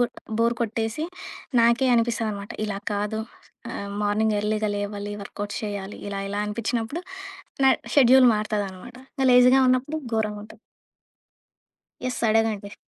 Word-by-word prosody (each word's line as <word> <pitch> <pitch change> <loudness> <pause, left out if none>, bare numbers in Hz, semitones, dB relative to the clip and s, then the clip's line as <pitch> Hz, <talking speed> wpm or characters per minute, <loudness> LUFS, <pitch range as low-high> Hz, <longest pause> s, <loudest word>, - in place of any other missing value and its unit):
గూడా, 245 - +1 0.3
బోర్ 235 +1 +3
కొట్టేసి, 225 +4 -2 0.6
నాకే 235 +3 +4
అనిపిస్తుందనమాట. 225 -3 -1
ఇలా 205 -2 -3
కాదు 210 +1 -2 0.5
ఆహ్, 200 0 -5
మార్నింగ్ 210 +1 +1
ఎర్లీగా 215 +1 0
లేవాలి. 205 0 -4
వర్కౌట్స్ 205 +1 -5
చేయాలి. 205 -1 -5
ఇలా, 200 -1 -4
ఇలా 205 +1 -2
అనిపిచ్చినప్పుడు, 230 +7 -2 0.6
నా - - +7 0.3
షెడ్యూల్ 260 -2 +7
మారుతదనమాట. 210 +2 -4 0.2
ఇంకా 265 - +1
లేజీగా 250 +2 +7
ఉన్నప్పుడు 255 +4 +1 0.2
ఘోరంగుంటది. 215 0 -3 1.4
యెస్. 255 0 -3
అడగండి. 215 -2 0
220 Hz, 115 wpm, -24 LUFS, 205-235 Hz, 1.4 s, నా